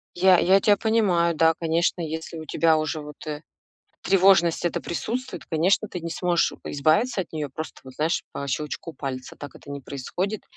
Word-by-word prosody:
Я 185 0 +5
я 190 +2 +5
тя 205 +1 +4
понимаю, 195 -7 +2
да, 160 +1 +4
конечно, 165 +2 0
если 160 +1 -5
у 160 - -8
тебя 160 +1 +3
уже, 155 0 -2
вот, 150 +1 -11
э, 150 0 -4 0.6
тревожность 190 -3 +4
эта 175 - 0
присутствует, 245 +9 -4
конечно, 180 +6 +1
ты 180 - -6
не 170 0 -5
сможешь, 175 0 +1
э, - - -6
избавиться 190 - +2
от 175 - -10
неё 150 -2 -3
просто, 155 +4 -7
вот, 130 -1 -12
знаешь, 155 +2 0
по 140 - -5
щелчку 150 +4 -4
пальца. 130 -3 -6
Так 145 - -10
это 145 - -11
не 140 0 -6
происходит. 180 +11 -4
165 Hz, 185 wpm, -24 LUFS, 155-185 Hz, 0.6 s, Я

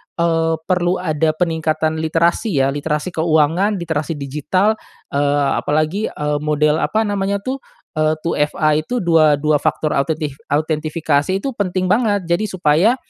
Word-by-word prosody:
eee, 165 -1 +1
perlu 180 0 +1
ada 155 -2 +1
peningkatan 160 -1 0
literasi 165 +2 +1
ya 135 - +1
literasi 150 +4 -2
keuangan, 165 +5 +2
literasi 165 -3 -2
digital, 150 +10 0 0.3
eee, 145 0 +1
apalagi, 155 +8 0
eee, 150 0 -2
model 150 +1 +1
apa 220 +5 +1
namanya 200 -1 -1
tuh, 265 +3 -3 0.4
eee, 155 0 +2
2FA 155 -1 0
itu 235 +9 -3
dua 160 -3 +4
dua 150 +1 +1
faktor 155 +1 -1
autentif 145 0 -1
autentifikasi 155 +1 0
itu 235 +8 -2
penting 185 -5 -1
banget 210 -3 +2
jadi 190 +5 +2
supaya, 185 +4 +2
160 Hz, 135 wpm, -18 LUFS, 150-185 Hz, 0.4 s, dua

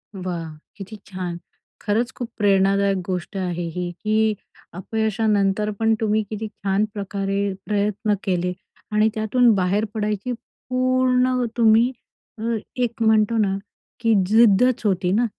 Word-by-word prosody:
वाह! 180 -3 -4 0.3
किती 200 +2 -8
छान! 180 -3 -5 0.4
खरंच 230 +4 0
खूप 240 -2 -5
प्रेरणादायक 200 -1 +3
गोष्ट 185 +2 -4
आहे 175 -2 -2
ही, 180 -1 -3
की 215 +4 0 0.4
अपयशानंतर 210 +1 0
पण 225 0 +3
तुम्ही 215 0 +1
किती 215 0 -4
छान 200 0 -1
प्रकारे 200 0 -2
प्रयत्न 210 +1 0
केले 180 -2 0 0.4
आणि 215 +1 +3
त्यातून 225 +2 +3
बाहेर 195 +3 +1
पडायची 215 +1 -2
पूर्ण 255 +1 0
तुम्ही, 230 +1 +5 0.5
अ, 230 +1 -1 0.2
एक 240 -2 -2
म्हणतो 220 0 +3
ना, 195 -2 +1 0.4
की 230 -1 +2
जिद्दच 230 +3 +4
होती 185 -3 +1
ना. 225 +5 +3
210 Hz, 125 wpm, -22 LUFS, 195-225 Hz, 0.5 s, तुम्ही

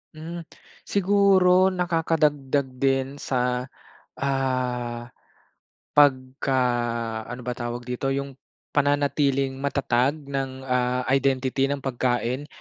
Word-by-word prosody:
Hmm, 165 +2 -7 0.4
siguro 190 -2 +4
nakakadagdag 155 -6 +1
din 135 +1 0
sa, 125 -3 -1 0.5
ah 125 -3 -1 0.9
pagka-ano 125 -4 +1
ba 125 - -2
tawag 120 0 -4
dito 125 +2 -3
yung 135 0 -3 0.3
pananatiling 145 -1 +2
matatag 140 -1 +1 0.2
ng, 135 -1 -3
ah, 125 -1 0
identity 135 0 +2
ng 140 0 -3
pagkain. 125 +1 -1
135 Hz, 85 wpm, -25 LUFS, 125-145 Hz, 0.9 s, siguro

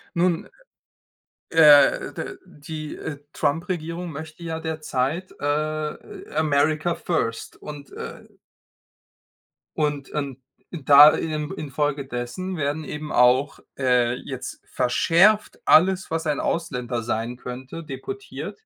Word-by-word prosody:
Nun, 170 -1 +1 1.0
äh, 150 -4 +6
d - - -6
die, 155 +1 -8
äh, 145 -3 -6
Trump-Regierung 165 +2 -2
möchte 155 +3 -9
ja 160 -1 -4
derzeit, 160 +1 -2
äh, 155 - -3
America 155 +2 +2
First 115 -11 -2
und, 145 -2 -10
äh - - -8 1.5
und 145 -2 -1
in 140 -4 -4 0.3
da 145 -2 +8
in 155 0 -3
infolgedessen 145 +1 -3
werden 145 +2 -1
eben 150 +1 -6
auch, 125 +3 +3 0.2
äh, 125 -2 +2
jetzt - - -7
verschärft 180 +12 +3
alles, 185 +3 +5
was 165 0 -2
ein 150 -2 0
Ausländer 125 -8 -2
sein 115 +1 -2
könnte, 130 +6 -7
deportiert. 395 - -7
150 Hz, 105 wpm, -24 LUFS, 140-165 Hz, 1.5 s, da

